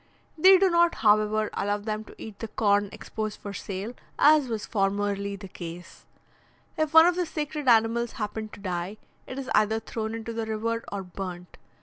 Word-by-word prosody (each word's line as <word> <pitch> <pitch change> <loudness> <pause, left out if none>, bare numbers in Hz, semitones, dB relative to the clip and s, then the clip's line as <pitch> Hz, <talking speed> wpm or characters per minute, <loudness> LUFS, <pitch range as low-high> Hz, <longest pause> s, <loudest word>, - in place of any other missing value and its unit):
They 375 +4 +7
do 385 +1 +4
not, 340 0 +4
however, 215 0 +3
allow 205 +1 0
them 215 +1 -4
to - - -14
eat 215 -2 -9
the 225 - -4
corn 205 -2 +2
exposed 215 -2 -5
for 205 - -7
sale, 200 +4 -5 0.2
as 300 -2 +5
was 220 -2 -3
formerly 200 -1 -1
the 200 0 -9
case. 175 -1 -10 0.7
If 310 -1 0
one 320 0 +9
of 350 0 +3
the 355 -1 -1
sacred 300 -2 -4
animals 230 0 +3
happen 215 0 -4
to - - -12
die, 185 +1 -4 0.3
it 260 - -7
is 270 -1 -5
either 215 +1 +3
thrown 220 0 -4
into 230 0 -5
the 225 -1 -3
river 230 +1 -2
or 200 -1 -4
burnt. 180 -1 -7
215 Hz, 185 wpm, -27 LUFS, 200-235 Hz, 0.7 s, one